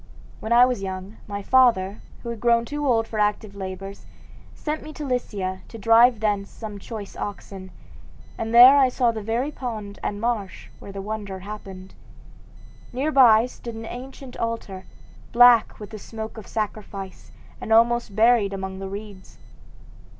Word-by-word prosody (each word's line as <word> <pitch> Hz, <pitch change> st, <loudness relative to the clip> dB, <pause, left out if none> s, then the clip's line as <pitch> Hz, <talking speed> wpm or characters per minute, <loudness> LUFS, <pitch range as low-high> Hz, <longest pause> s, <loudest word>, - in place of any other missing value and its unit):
When 220 Hz, -, -6 dB
I 240 Hz, +1 st, +7 dB
was 250 Hz, -5 st, -2 dB
young, 190 Hz, +2 st, -6 dB
my 200 Hz, -1 st, -5 dB
father, 220 Hz, -6 st, +3 dB, 0.2 s
who 235 Hz, -, -5 dB
had 235 Hz, -2 st, -5 dB
grown 235 Hz, 0 st, +3 dB
too 295 Hz, +2 st, -3 dB
old 225 Hz, -3 st, +2 dB
for 220 Hz, -, -5 dB
active 210 Hz, 0 st, 0 dB
labors, 195 Hz, 0 st, -8 dB, 0.5 s
sent 305 Hz, 0 st, -4 dB
me 310 Hz, -, -10 dB
to 300 Hz, -, -6 dB
Lycia 200 Hz, -8 st, -3 dB
to 230 Hz, -, -10 dB
drive 230 Hz, +2 st, +5 dB
thence 205 Hz, -2 st, 0 dB
some 210 Hz, -3 st, -8 dB
choice 205 Hz, -1 st, -8 dB
oxen, 195 Hz, -2 st, -7 dB, 0.7 s
and 225 Hz, 0 st, -4 dB
there 250 Hz, +4 st, +9 dB
I 265 Hz, -2 st, +5 dB
saw 245 Hz, -2 st, +1 dB
the 220 Hz, -1 st, -6 dB
very 235 Hz, +7 st, -2 dB
pond 215 Hz, -7 st, -6 dB
and 205 Hz, -, -3 dB
marsh 210 Hz, -6 st, -3 dB
where 200 Hz, -, -10 dB
the 195 Hz, 0 st, -7 dB
wonder 205 Hz, -2 st, -5 dB
happened. 190 Hz, -2 st, -9 dB, 1.0 s
Near 275 Hz, +5 st, -1 dB
by 235 Hz, -5 st, +6 dB
stood 235 Hz, -2 st, -9 dB
an 225 Hz, 0 st, -7 dB
ancient 255 Hz, +2 st, -9 dB
altar, 225 Hz, -5 st, -4 dB, 0.5 s
black 240 Hz, -1 st, +6 dB
with 210 Hz, 0 st, -9 dB
the 215 Hz, -, -8 dB
smoke 220 Hz, +2 st, -8 dB
of 220 Hz, -3 st, -10 dB
sacrifice 205 Hz, -3 st, -6 dB, 0.3 s
and -, -, -6 dB
almost 235 Hz, -2 st, +3 dB
buried 225 Hz, -2 st, +4 dB
among 190 Hz, -1 st, -5 dB
the 195 Hz, 0 st, -6 dB
reeds. 200 Hz, -1 st, -10 dB
220 Hz, 165 wpm, -23 LUFS, 200-240 Hz, 1.0 s, there